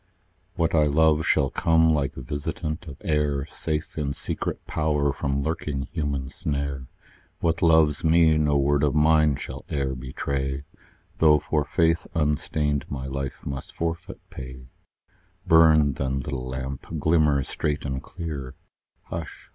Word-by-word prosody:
What 85 -2 0
I 75 -2 +4
love 80 +1 +3
shall 70 - +3
come 80 -1 +3
like 70 -2 -1
visitant 75 +5 -4
of 70 -3 -8
air, 75 -3 0
Safe 80 0 -4
in 70 -2 -1
secret - - -4
power 75 -2 0
from 70 0 -1
lurking 75 -3 -2
human 70 -5 -2
snare; 70 -3 -3 0.5
What 85 0 0
loves 80 -3 +4
me, 80 -1 +5
no 75 -1 +2
word 70 +1 +2
of 75 0 +2
mine 75 -1 +4
shall - - -7
e'er 70 -2 -1
betray, 65 +1 -3 0.6
Though 75 -2 +6
for 75 0 0
faith 80 +2 +1
unstained 75 -1 0
my 65 -2 -4
life 70 0 -5
must 70 -1 -6
forfeit 85 +3 -4
pay 65 -1 -9 0.8
Burn, 80 -3 +6
then, 65 0 -2
little 65 -1 -4
lamp; 65 +1 -5
glimmer 75 -2 +3
straight 75 +2 -2
and 65 -1 -3
clear 75 -5 -6 0.5
Hush! 80 -1 -7
75 Hz, 140 wpm, -25 LUFS, 70-80 Hz, 0.8 s, Though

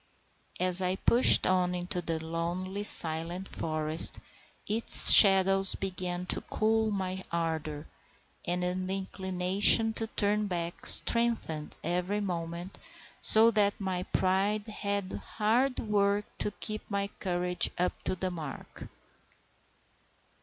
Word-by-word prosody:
As 185 0 +1
I 185 0 -1
pushed 235 +5 +3
on 180 -1 -1
into 180 0 -5
the 165 -1 -4
lonely, 175 +4 -6
silent 170 0 +1
forest, 155 0 0 0.5
its 220 +3 +5
shadows 195 -1 +7
began 180 -2 -5
to - - -1
cool 220 0 -2
my 190 -2 -5
ardour, 160 -3 -5 0.6
and 180 +1 -3
the 185 +2 -4
inclination 190 +3 +2
to 225 0 -2
turn 210 -1 -2
back 170 -2 -5
strengthened 230 -10 +1
every 180 +5 -3
moment, 175 -1 -7 0.4
so 225 +1 +7
that 205 -2 0
my 190 -2 -4
pride 195 +3 -2
had 200 -3 -4 0.2
hard 240 +5 0
work 205 -1 -2
to - - -2
keep 215 +1 -8
my 200 -1 -3
courage 180 -1 -2
up 180 +1 -1
to - - -2
the 185 0 -4
mark. 165 -3 -10
185 Hz, 115 wpm, -27 LUFS, 175-205 Hz, 0.6 s, shadows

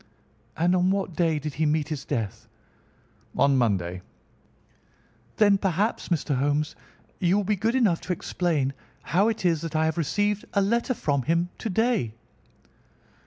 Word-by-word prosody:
"And 175 +3 +3
on 180 0 +3
what 190 -3 -1
day 165 -3 +2
did 150 0 -4
he 155 +1 0
meet 150 0 0
his 150 -4 -4
death?" 115 -8 -3 0.9
"On 140 -1 +4
Monday." 95 -8 0 1.4
"Then 205 -2 +5
perhaps, 195 +4 0
Mr. 155 -5 0
Holmes, 145 +3 0 0.4
you 180 +2 +3
will 205 - +1
be 210 +2 +1
good 225 +5 0
enough 210 -10 +2
to 185 - -2
explain 155 -6 -1 0.3
how 190 +6 +2
it 225 -4 -2
is 165 -3 +2
that 165 -1 -5
I 160 0 +3
have 160 +1 -1
received 205 +6 0
a 200 - +4
letter 235 +5 +1
from 145 -8 0
him 170 +6 0
to 225 - -3
day." 215 - +1
170 Hz, 160 wpm, -26 LUFS, 145-200 Hz, 1.4 s, Then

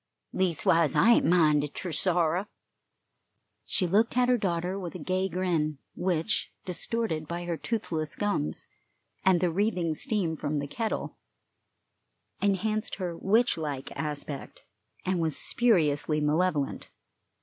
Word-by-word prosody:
Leastwise 165 -4 +2
I 235 - +6
ain't - - +5
minded 150 -4 +3
ter 180 - -4
sorrow." 175 +3 +1 1.2
She 185 - +2
looked 215 +7 +2
at 250 0 +4
her 250 - +4
daughter 180 0 -1
with 180 -2 -6
a - - -3
gay 185 +3 -1
grin, 165 -4 0 0.2
which, 175 +1 -1
distorted 180 -3 -1
by 175 +1 -4
her 170 -1 -1
toothless 165 -7 -3
gums 205 - -1 0.6
and 185 -2 +4
the 180 -2 +2
wreathing 180 -3 0
steam 175 -1 -1
from 150 -1 -2
the 145 - -2
kettle, 220 +10 -3 1.2
enhanced 215 +2 0
her 180 -3 -4
witch 220 +6 +2
like 145 -4 -4
aspect 150 -2 -5 0.4
and 185 -1 0
was 160 -3 0
spuriously 155 -10 +2
malevolent. 150 -1 0
175 Hz, 125 wpm, -28 LUFS, 155-195 Hz, 1.2 s, I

